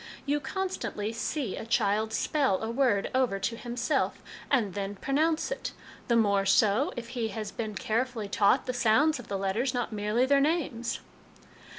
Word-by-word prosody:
You 290 +1 +1
constantly 295 - -3
see 230 +1 -2
a - - -5
child 220 -1 +1
spell 260 -5 +1
a 220 - -2
word 235 -5 +1
over 255 -6 +2
to 215 +4 -2
himself, 245 +3 -1 0.3
and 225 -9 +2
then 200 +1 -3
pronounce 310 - 0
it; - - -4 0.3
the 235 - +3
more 200 -3 +3
so, 205 +6 +3
if 235 -1 -6
he 235 -3 -2
has 220 -2 -5
been 215 -3 -4
carefully 230 +1 -1
taught 205 +5 +3
the 255 - -2
sounds 245 +6 +3
of 245 - -10
the 200 - -2
letters 215 +7 -1
not 245 -2 -2
merely 210 +4 +1
their 280 +1 +4
names." 280 -6 -1
235 Hz, 170 wpm, -29 LUFS, 210-270 Hz, 0.3 s, their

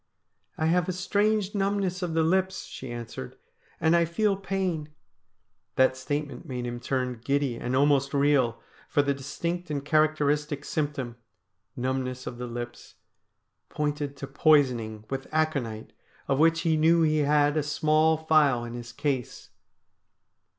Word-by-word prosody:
' - - -51
I 160 - 0
have 175 +2 +2
a - - 0
strange 205 +2 +1
numbness 195 -2 0
of 170 -3 -2
the 165 - +3
lips,' 190 +3 +1
she 130 -2 -8
answered, 120 - -7 0.2
' - - -33
and 160 +2 +3
I 170 0 +4
feel 200 +5 +1
pain 190 -5 -2 0.4
' - - -50
That 130 0 +4
statement 145 +3 -4
made 125 -2 -4
him 120 0 -4
turn 125 -2 -2
giddy 140 -2 0
and 125 +2 -2
almost 140 0 +3
reel, 140 -5 +2 0.3
for 145 - +3
the 140 0 +1
distinct 170 +6 -4
and 145 -2 -3
characteristic 150 -1 +1
symptom 140 -6 -3 0.3
— 95 -2 -52
numbness 130 0 -2
of 120 - -6
the 125 - -4
lips 120 0 -7 0.4
— - - -52 0.3
pointed 145 -1 -2
to 135 - -5
poisoning 125 -7 +2
with 135 0 -3
aconite, 140 -9 -1 0.3
of 135 - +1
which 165 +1 +4
he 160 -2 +2
knew 165 +2 +4
he 155 -1 +2
had 145 0 +3
a 155 - +2
small 155 +2 +2
phial 155 -6 +3
in 120 0 -6
his 120 -1 -7
case. 135 -5 -3
145 Hz, 160 wpm, -27 LUFS, 130-160 Hz, 0.4 s, I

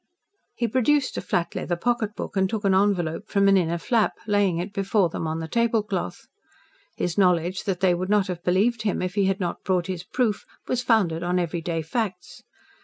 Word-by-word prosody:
He 235 - 0
produced 260 +4 +2
a - - -1
flat 170 - -1
leather 175 - -2
pocketbook 220 +1 -2
and 190 -1 +2
took 220 0 -3
an 195 - +4
envelope 190 -1 +1
from 200 -1 +3
an 195 - +6
inner 170 -2 +1
flap, 220 +6 +1
laying 205 -4 +2
it 185 +4 -4
before 195 -2 +1
them 165 - -4
on 160 +1 -3
the 160 - -4
tablecloth. 220 -2 -1 0.7
His 180 +3 -2
knowledge 180 -1 +2
that 190 -3 -2
they 185 -2 +4
would 185 +2 -3
not 210 -2 +3
have 180 -3 -5
believed 215 +6 +2
him 205 -4 -1
if 180 0 -2
he 200 -1 +2
had 195 +1 0
not 175 -3 -3
brought 180 -2 +1
his 180 -2 -4
proof 220 +2 -1 0.2
was 250 - 0
founded 195 -10 +2
on 175 +1 0
everyday 170 -1 -2
facts. 185 +1 -4
190 Hz, 195 wpm, -24 LUFS, 175-215 Hz, 0.7 s, an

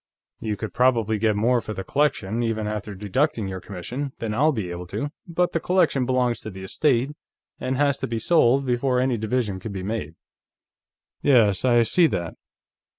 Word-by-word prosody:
You 105 -2 -3
could 110 - -5
probably 115 -4 +2
get 110 -1 +2
more 120 +3 +2
for 110 - -6
the 95 - -4
collection, 120 -4 0
even 115 -2 -1
after 105 -1 -4
deducting 105 +3 0
your 95 -1 -5
commission, 125 +10 -5
than 110 -2 -3
I'll 150 +8 +3
be 105 -10 -3
able 85 0 -6
to, 115 +11 -4 0.2
but 175 +1 0
the 165 - 0
collection 165 -8 +2
belongs 125 -2 +1
to 110 - -7
the 95 -2 -9
estate, 130 +5 +1 0.5
and 130 0 -2
has 140 -1 +2
to - - -2
be 115 - -2
sold 135 +1 +3
before 125 +1 +1
any 130 -1 +1
division 110 -3 -1
can 105 +3 -6
be 95 -2 -5
made." 95 -7 -4 1.1
"Yes, 110 -9 +4
I 120 -2 +5
see 165 +9 +4
that. 85 - -3
115 Hz, 185 wpm, -24 LUFS, 105-130 Hz, 1.1 s, I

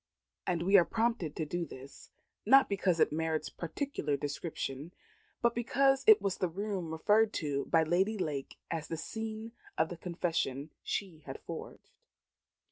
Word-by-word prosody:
And 170 -2 0
we 195 +3 +6
are 175 - +7
prompted 220 -6 -1
to 160 - -2
do 175 +3 -2
this, 135 -3 -11 0.3
not 270 0 +7
because 190 -4 +1
it - - +4
merits 160 0 -1
particular 170 - -2
description, 145 +1 -4 0.5
but 235 0 +4
because 270 +3 +2
it 220 0 +9
was 195 -2 -1
the 185 - +1
room 195 -1 -3
referred 210 +7 +3
to 145 -3 -1
by 165 -1 +4
Lady 190 +7 +1
Lake 145 -7 -3
as 160 -2 -3
the 165 - -4
scene 220 +5 -5 0.3
of 160 - +2
the 175 - -6
confession 165 -5 -2
she 185 -6 -3
had - - -6
forged. - - -9
175 Hz, 155 wpm, -32 LUFS, 160-215 Hz, 0.5 s, it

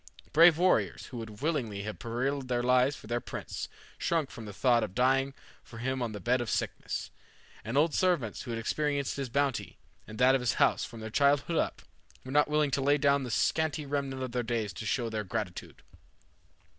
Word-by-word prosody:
Brave 165 0 +7
warriors, 180 +2 +2
who 125 - -6
would 110 +1 -8
willingly 120 -11 -1
have 105 0 -6
perilled 130 +4 -2
their 120 -1 0
lives 125 +3 +3
for - - -13
their 120 +2 -2
prince, - - -6 0.3
shrunk 165 -5 0
from 115 - -9
the 105 - -7
thought 120 +2 +3
of 100 -3 -5
dying 135 +2 +2 0.3
for 115 - -12
him 130 +2 -2
on 120 -2 -1
the 105 - -6
bed 120 +6 +1
of 120 - -3
sickness; - - -3 0.5
and 115 +5 -2
old 155 +1 +3
servants 170 - +1
who 125 - -9
had 115 -1 -2
experienced 140 +4 -1
his 135 -2 -3
bounty 140 +1 -1 0.3
and 110 - -9
that 125 +2 +5
of 135 - +2
his 120 -4 +1
house - - +3
from 115 -1 -8
their 110 0 -6
childhood 145 +5 +2
up, - - -1 0.4
were 130 - -6
not 150 +2 +4
willing 150 -1 +1
to 135 - +1
lay 145 +2 +4
down 140 0 +3
the 130 - -4
scanty 155 +6 +1
remnant 140 -2 -2
of 130 - -4
their 125 0 0
days 115 -4 -2
to 105 - -6
show 120 +4 0
their 110 -1 -3
gratitude. 90 -2 -5
130 Hz, 205 wpm, -30 LUFS, 115-140 Hz, 0.5 s, Brave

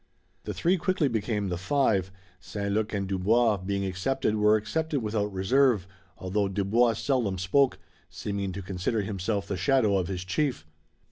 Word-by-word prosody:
The - - -3
three 180 +3 +2
quickly 180 -3 +1
became 110 -4 -1
the 90 -1 -3
five. 100 -3 +1 0.3
St 100 +1 -4
Luc 110 +1 0
and 100 -2 -2
Dubois 105 +4 +2
being 100 +1 -2
accepted 100 +6 -1
were 105 0 +4
accepted 140 +6 -1
without 105 -1 -1
reserve, 105 +2 +2 0.3
although 100 +2 -1
Dubois 105 +5 +2
seldom 115 -5 0
spoke, 130 +9 +2 0.3
seeming 100 +1 -4
to 100 +1 -6
consider 95 +4 -2
himself 100 +1 -2
the 95 - -3
shadow 105 +1 +3
of 90 - -2
his 95 -1 -4
chief. 125 - -1
105 Hz, 155 wpm, -27 LUFS, 95-120 Hz, 0.3 s, were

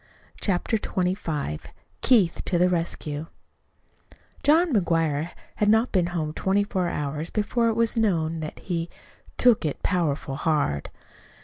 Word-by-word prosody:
CHAPTER 205 +3 0
XXV 180 - -2 0.4
KEITH 210 -10 +3
TO 180 - 0
THE 180 +1 +4
RESCUE 165 -3 -2 1.1
John 320 +1 +4
McGuire 165 -5 +1 0.3
had 210 - +2
not 220 +3 +3
been 180 -3 +2
home 160 -3 -2
twenty 195 +4 +1
four 185 -3 -1
hours 150 +2 -3
before 230 +2 0
it 225 - 0
was 230 0 +2
known 165 -8 +1
that 155 -1 -6
he 170 -2 -3 0.5
"took 245 -5 +4
it 150 -3 -3
powerful 155 -6 0
hard." 145 - 0
175 Hz, 130 wpm, -25 LUFS, 155-210 Hz, 1.1 s, THE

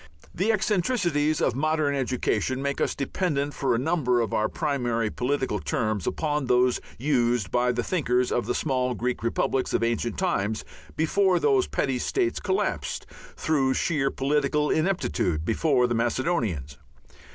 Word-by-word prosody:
The 200 +6 +1
eccentricities 180 - +1
of - - +2
modern 155 +2 +1
education 130 0 -1
make 140 0 -2
us - - 0
dependent 145 0 -1
for 135 -3 0
a - - +1
number 130 -3 +1
of 115 -3 -1
our 110 0 +1
primary 120 -8 -1
political 130 -4 -1
terms 110 -4 -1
upon 150 -3 -1
those 125 0 +3 0.2
used 120 -7 +1
by 125 0 +2
the 120 0 -1
thinkers 125 -8 0
of 120 -3 0
the 125 - 0
small 130 -4 0
Greek 125 +1 -2
republics 115 +3 0
of - - +1
ancient 115 -1 -1
times 105 +3 -1 0.3
before 180 +3 +2
those 135 -4 +3
petty 130 -2 -1
states 365 - 0
collapsed, 380 - -2 0.3
through 135 -5 +1
sheer 145 -5 +1
political 145 +2 0
ineptitude, 155 - 0
before 125 - +2
the 120 - 0
Macedonians. 115 - -1
135 Hz, 145 wpm, -26 LUFS, 120-155 Hz, 0.3 s, those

